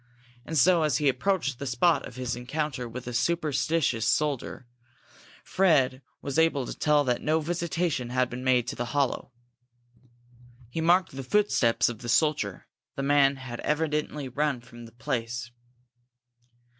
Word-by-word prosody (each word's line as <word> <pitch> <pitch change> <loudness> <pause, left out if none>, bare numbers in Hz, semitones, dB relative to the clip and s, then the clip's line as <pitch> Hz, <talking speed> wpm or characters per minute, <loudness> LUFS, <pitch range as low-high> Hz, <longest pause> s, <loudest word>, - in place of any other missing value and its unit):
And 160 - -2
so, 170 +5 +5
as 150 -3 +2
he 150 -1 +1
approached 140 -1 0
the 140 - -4
spot 155 +7 +2
of 125 - -13
his 125 -2 -3
encounter 125 0 -3
with 125 +2 -8
the 125 - -5
superstitious 150 -4 0
soldier, 145 -3 -1 0.8
Fred 145 -9 +2 0.2
was 140 +2 -1
able 160 -5 +2
to - - -6
tell 150 -1 +3
that 125 -3 0
no 155 +1 +1
visitation 170 -4 -2
had 125 +1 +1
been 125 +1 -7
made 125 -2 +2
to - - -5
the 120 - -3
hollow. 140 -3 0 1.4
He 160 - -3
marked 175 +2 +3
the 135 - -4
footsteps 130 - +2
of 120 -3 -4
the 120 - -7
soldier; 125 - +1 0.3
the 135 - -3
man 140 0 +4
had 130 -3 -8
evidently 150 -2 -1
run 140 0 -1
from 120 0 -13
the - - -15
place. 120 +1 -4
135 Hz, 155 wpm, -27 LUFS, 125-155 Hz, 1.4 s, so